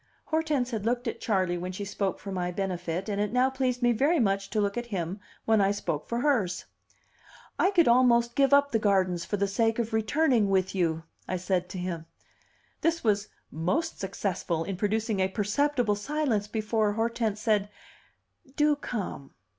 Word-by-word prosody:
Hortense 300 -6 0
had 220 -3 -3
looked 240 +2 0
at - - -4
Charley 185 -5 0
when 180 +1 -4
she 200 +2 -5
spoke 195 -1 -2
for 195 - -7
my 180 -2 -2
benefit, 180 -1 -3
and 205 -1 -1
it 210 - -1
now 250 +2 +3
pleased 255 -2 -1
me 240 - +5
very 285 +9 +2
much 195 -3 +1
to 215 - -1
look 200 -1 0
at 240 0 -3
him 190 -2 -3 0.3
when 220 -2 +4
I 195 - +3
spoke 200 -7 -3
for 235 +1 -1
hers. 230 -11 +1 0.9
"I - - +4
could 355 -5 +4
almost 235 -1 +4
give 275 +1 +3
up 285 0 +5
the 225 - +2
gardens 185 -4 +1
for 205 - -2
the 200 0 +1
sake 225 +3 +1
of 230 -1 -2
returning 225 0 +2
with 190 -1 +1
you," 165 -4 0 0.2
I 185 - -1
said 180 0 -1
to 185 - -6
him. 175 -3 -4 0.7
This 330 0 +1
was 210 -2 +1 0.2
most 275 - -1
successful 185 -4 -2
in 195 +2 -4
producing 215 +2 0
a 190 - +3
perceptible 225 +3 +1
silence 235 -2 -1
before 215 -1 0
Hortense 225 -1 -1
said, 210 -2 +1 0.9
"Do 295 0 +3
come." 205 - -5
210 Hz, 180 wpm, -28 LUFS, 190-245 Hz, 0.9 s, me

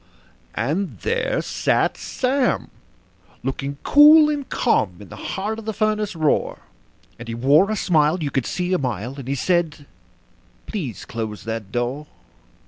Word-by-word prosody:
And 155 - -2
there 475 +1 0
sat - - +1
Sam, 260 0 -1 0.7
looking 135 +1 -3
cool 300 +1 +7
and 285 -2 -4
calm, 100 - +1
in 100 -3 -12
the - - -9 0.2
heart 215 +3 -2
of 225 - -10
the 220 - -2
furnace 215 -2 0
roar; 155 -2 0 0.6
And 120 - -9
he 115 - -4
wore 145 - +4
a 215 - 0
smile 160 -3 +2
you 140 - -2
could 135 -3 -1
see 180 0 -2
a 185 - +2
mile, 125 -2 -3
and 130 - -8
he 140 - -1
said: 160 -1 0 0.8
"Please 150 - -5
close 110 -2 -5
that 110 -3 -5
door. 125 +6 -2
155 Hz, 150 wpm, -22 LUFS, -, 0.8 s, cool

